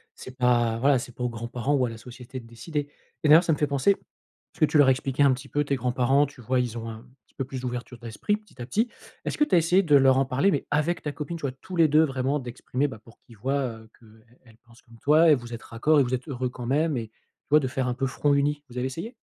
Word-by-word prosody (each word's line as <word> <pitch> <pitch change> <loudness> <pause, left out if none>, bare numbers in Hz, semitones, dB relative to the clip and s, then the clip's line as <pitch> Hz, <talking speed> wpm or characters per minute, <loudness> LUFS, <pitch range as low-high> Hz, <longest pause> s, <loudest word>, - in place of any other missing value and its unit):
C'est 130 - -11
pas, 120 -3 +2
voilà, 135 +1 +4
c'est 120 0 -8
pas 125 - -5
aux 125 - 0
grands-parents 120 +4 -2
ou 130 -2 +2
à - - -3
la 115 - -8
société 125 +2 -9
de - - -16
décider. 145 +6 -5 0.3
Et 155 - +2
d'ailleurs, 160 +3 +8
ça 165 - +3
me - - -2
fait 150 - +2
penser, 140 +6 +2
est - - +2 0.6
ce - - -19
que 155 - +6
tu 155 - +1
leur 145 -2 +6
as - - +7
expliqué 135 +1 0
un 140 -2 +5
petit 130 +2 -7
peu, 145 +1 0
tes 140 -1 -1
grands-parents? 130 +3 +2
Tu 140 -2 -13
vois, 125 +3 0
ils 120 -2 -2
ont 115 0 -5
un 110 +2 -10 0.2
petit - - -33
peu 135 - -3
plus 130 0 -6
d'ouverture 125 0 -5
d'esprit, 115 - -2
petit 210 - -16
à - - -4
petit, 225 - 0 0.4
est-ce - - -3
que - - +4
tu 195 - +2
as - - +6
essayé 170 +3 +4
de 155 -6 +3
leur 135 -1 +5
en 135 - +3
parler, 140 +10 +2
mais 145 - -1
avec 150 +4 0
ta 150 - -3
copine, 155 +3 -5
tu - - -13
vois? 140 - -2
Tous 185 -1 -7
les 165 -1 +6
2, 155 +2 +5
vraiment 135 -1 0
d'exprimer, 125 +2 -3
bah, 110 - -9
pour 115 - -18
qu'ils 115 -3 -18
voient, 135 +6 -1 0.2
heu, 110 0 -16
qu'elle 110 -1 -20 0.2
elle 110 -2 -19
pense 120 0 -22
comme 115 -1 -18
toi 155 +4 +5
et - - +7
vous 120 -2 -8
êtes 115 - -7
raccord 150 +7 +2
et - - +5
vous 125 0 -3
êtes 130 +3 -3
heureux 130 -3 -2
quand 125 0 -8
même, 150 +3 +1
et 115 -2 -4
tu - - -43
vois 150 +2 +6
de 130 - -1
faire 130 0 -2
un 125 - 0
peu 130 +2 -2
front 145 +2 +1
uni? 145 +1 +1
Vous 125 - -10
avez 125 +1 0
essayé? 165 - -6
130 Hz, 300 wpm, -26 LUFS, 120-145 Hz, 0.6 s, d'ailleurs